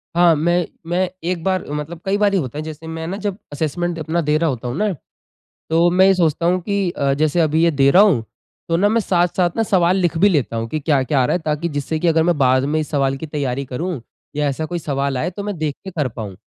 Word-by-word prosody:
हाँ, 175 -1 +5
मैं 175 +3 +1 0.2
मैं 180 +1 +1 0.2
एक 170 -3 -2
बार 185 -1 0
मतलब 150 +3 -5
कई 195 +1 +1
बार 205 -1 +2
ही 195 - +3
होता 135 -1 -5
है 155 - -3
जैसे 155 +1 -8
मैं 160 0 -5
न 195 +3 -4
जब 205 -1 -3 0.2
असेसमेंट 165 +3 -2
अपना 160 +3 -1
दे 150 0 +1
रहा 165 -1 +1
होता 125 -1 -4
हूँ 120 - -3
न? 210 -2 0 0.8
तो 170 +2 +4
मैं 185 +2 +5
ये 195 - +5
सोचता 170 -1 +1
हूँ 180 +1 +2
कि 200 -1 -1
अ, 140 -4 0
जैसे 155 +3 +1
अभी 160 +1 +2
ये 170 - +4
दे 140 -2 +3
रहा 190 +6 +7
हूँ 150 - +3 0.4
तो 165 - +2
न 200 +4 +2
मैं 230 - +3
साथ-साथ 175 -2 +1
न - - +4
सवाल 185 -3 +2
लिख 175 -3 0
भी 205 +3 +5
लेता 140 -9 0
हूँ 115 0 -3
कि 155 - -2
क्या-क्या 140 -2 +1
आ - - +3
रहा - - +1
है? - - -4
ताकि 155 +2 -1
जिससे 145 +1 -3
कि 170 +2 +1
अगर 160 0 +3
मैं 170 0 +2
बाद 130 0 +3
में 150 +2 0
इस 155 - -4
सवाल 135 -2 +1
की 160 - -6
तैयारी 140 -3 -2
करूँ 140 +3 -4 0.4
या 150 0 +1
ऐसा 140 +3 -3
कोई 175 +2 -3
सवाल 140 -3 -2
आए 165 +7 -1
तो 200 +3 -7
मैं 205 -3 -3
देख 150 -2 -2
के 190 - -6
कर 150 -7 -1
पाऊँ 110 -5 -7
160 Hz, 265 wpm, -19 LUFS, 145-180 Hz, 0.8 s, रहा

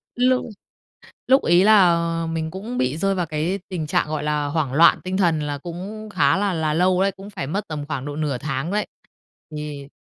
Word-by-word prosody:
Lúc 255 +1 +2 0.8
lúc 265 +2 +5
ấy 175 +2 +4
là, 205 -3 +6 0.3
ờ, 165 - -3
mình 160 -1 -3
cũng 215 +7 -6
bị 130 +4 0
rơi 195 +3 +1
vào 180 -2 -1
cái 160 +5 -2
tình 170 -5 -4
trạng, 150 - +1
gọi 150 -1 -3
là, 150 -1 0
hoảng 145 -2 -1
loạn 165 +4 +6
tinh 185 +1 -2
thần, 170 -5 +2
là 145 -1 -3
cũng 190 +8 -7
khá 145 -5 +2
là 200 -1 0
là 160 -2 0
lâu 180 +3 +2
đấy, 195 +1 +2
cũng 195 +1 -11
phải 160 -9 -5
mất 200 +7 -3
tầm 150 -2 -5
khoảng 135 -3 -4
độ 145 0 -5
nửa 150 -4 -1
tháng 135 +4 -3
đấy. 210 +1 -1 0.7
Thì 150 -2 -6
165 Hz, 215 wpm, -22 LUFS, 150-195 Hz, 0.8 s, là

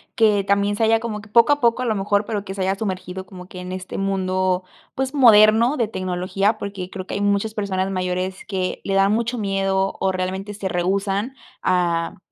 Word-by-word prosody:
que 210 -3 +3
también 200 +1 +1
se 225 - 0
haya 225 0 +4
como, 215 -3 -4
que 215 - -16
poco 235 +5 +5
a 290 - -2
poco, 235 0 +2
a - - -1
lo 220 -3 0
mejor, 205 +1 +1
pero 205 -2 -3
que 190 - -5
se 195 - -5
haya 190 +1 +1
sumergido 190 -2 -5
como 180 -2 -11
que 185 - -10
en 180 0 -7
este 185 0 -6
mundo, 185 -1 0 0.3
pues, 265 +1 -2
moderno 230 -1 +6
de 235 -4 +1
tecnología, 185 +2 -1
porque 195 -3 -6
creo 185 -1 -7
que - - -5
hay 200 - -2
muchos 205 +2 +1
personas 195 -2 -2
mayores 185 0 -3
que, 185 -2 -3
le 195 - -1
da 195 0 +4
mucho 235 +3 0
miedo, 195 -2 0
o 190 - +1
realmente 190 +2 -3
se 200 -1 -4
rehúsan 195 +7 -1 0.3
a, 170 -2 0
195 Hz, 210 wpm, -21 LUFS, 185-215 Hz, 0.3 s, moderno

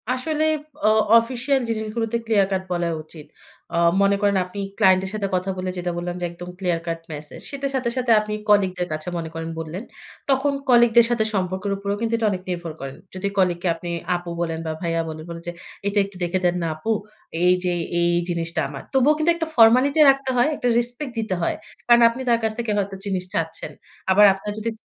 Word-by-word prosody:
আসলে 300 +5 -1 0.4
অ - - +6 0.3
অফিসিয়াল 255 +4 0
জিনিসগুলোতে 225 +1 -2
clear 210 -4 +3
cut 190 -1 0
বলা 175 -1 0 0.2
উচিত। 155 -1 -13 0.5
আ - - -1 0.3
মনে 200 0 +4
করেন 200 -1 +3
আপনি 185 +3 -8 0.2
ক্লায়েন্ট 190 -3 +5
এর - - -4
সাথে 210 -2 -2
কথা 185 +1 -1
বলে 185 0 -3
যেটা 175 0 -2
বললাম 175 0 -3
যে - - 0
একদম 175 +1 -9
ক্লিয়ার 175 -3 0
কাট 165 0 -2
মেসেজ 150 0 -9
সে - - -5 0.2
সাথে, 255 -2 0
সাথে, 250 -2 +1
আপনি 210 0 -4 0.2
কলিগদের 185 -3 +3
কাছে 155 +1 -4
মনে 165 -1 -4
করেন 165 0 -5
বললেন। 165 +6 -5 0.5
তখন 275 +1 +2 0.2
কলিগদের 240 -1 +6
সাথে 240 -2 +2
সম্পর্কের 190 +1 -1
উপরেও 200 +1 -3
কিন্তু 230 0 -1
এটা 225 -1 +1
অনেক 185 -2 -3
নির্ভর 170 -2 -4
করেন। 135 0 -7 0.2
যদি 190 +2 -2
কলিগকে 180 -1 +1
আপনি 175 +1 -7 0.3
আপু 175 0 -5
বলেন 165 -1 -2
বা 160 - -2
ভাইয়া 165 -1 0
বলে 155 0 -7
বলেন 170 0 -7
যে - - -2 0.4
"এটা 200 +1 +2
একটু 200 -1 -12
দেখে 175 +2 0
দেন 175 0 +2
না - - 0
আপু। 155 +9 -3 0.5
এই 180 0 +6
যে 180 -1 0 0.3
এই 170 0 +3 0.2
জিনিসটা 165 -1 -2
আমার।" 140 -1 -8
তবুও 270 +3 +5
কিন্তু 310 +2 +3
একটা 330 -1 -3
ফর্মালিটি 250 +6 +5
রাখতে 275 -1 +2
হয়, 245 - +4
একটা 245 - -2
রেসপেক্ট 245 +3 -3
দিতে 215 -4 -1
হয়। 165 - 0 0.3
কারণ 240 0 +6
আপনি 235 +3 -6
তার 235 -1 +4
কাছ 220 - +1
থেকে 235 -2 -1
হয়তো 200 -1 -2
জিনিস 190 -2 -1
চাচ্ছেন। 165 0 -3 0.4
আবার 205 +2 +7
আপনার 195 +2 -6
যদি 220 +1 -2
195 Hz, 205 wpm, -22 LUFS, 175-235 Hz, 0.5 s, আবার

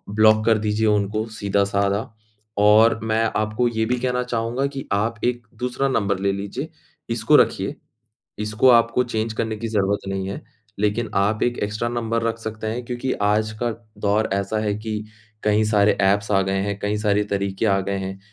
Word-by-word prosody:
Block 110 0 +5
कर 115 -1 +4
दीजिए 105 +1 0
उनको, 105 +1 +1
सीधा-साधा 100 -1 0 0.5
और 110 +2 +5
मैं 110 0 +1
आपको 110 +3 0
ये 110 -1 -1
भी 125 +2 0
कहना 125 0 0
चाहूँगा 120 +2 -1
कि 135 - -5
आप 110 +3 0
एक 120 -1 -1
दूसरा 125 +2 -1
नंबर 100 -6 0
ले 100 0 +1
लीजिए, 100 0 -5 0.4
इसको - - +2
रखिए। - - +1 0.7
इसको 105 +4 +3
आपको 115 +1 +4
चेंज 110 -2 -2
करने 110 0 -2
की 115 +2 -4
ज़रूरत 100 -2 0
नहीं 95 0 -3
है, 100 - -5 0.4
लेकिन 105 +2 0
आप 100 +2 +2
एक 120 0 0
एक्स्ट्रा 105 +3 -2
नंबर 115 -1 -1
रख 115 0 -1
सकते 110 -1 -5
हैं 120 +3 -3
क्योंकि 125 +2 -3
आज 105 +1 +2
का 120 -1 +1 0.3
दौर 105 +2 +1
ऐसा 100 +2 -1
है 105 -1 -1
कि, 110 -1 -4 0.4
कई 105 0 +3
सारे 105 -1 +3
एप्स 100 +2 +2
आ 95 -1 +4
गए 95 0 0
हैं, 100 0 -2
कई 105 +1 -1
सारे 105 -1 +1
तरीके 100 0 -2
आ 95 -1 +3
गए 100 +1 -2
हैं 95 0 -5
110 Hz, 185 wpm, -22 LUFS, 100-115 Hz, 0.7 s, Block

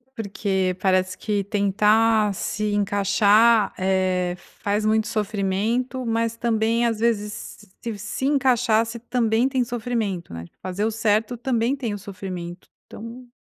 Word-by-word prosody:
Porque 195 -4 -1
parece 185 -1 +1
que 205 0 -1
tentar 210 +1 +3
se 210 +2 -2
encaixar, 205 +2 +3
eh, 185 -1 +1 0.3
faz 205 +1 0
muito 215 0 +2
sofrimento, 215 +5 -1
mas, 230 0 0
também, 230 0 +1
às 225 -2 -1
vezes, 210 -2 -2 0.3
se 210 +6 -5
encaixar 250 -5 +3
se 230 +1 -6
também 235 +1 +1
tem 260 -2 0
sofrimento, 225 -6 -3
né, 85 0 -7
fazer 185 +3 -3
o 225 - +1
certo 220 +1 0
também 240 +1 0
tem 235 -6 -3
o 205 - -5
sofrimento, 185 -3 -7 0.2
então. 235 +3 -10
215 Hz, 130 wpm, -23 LUFS, 195-230 Hz, 0.3 s, tentar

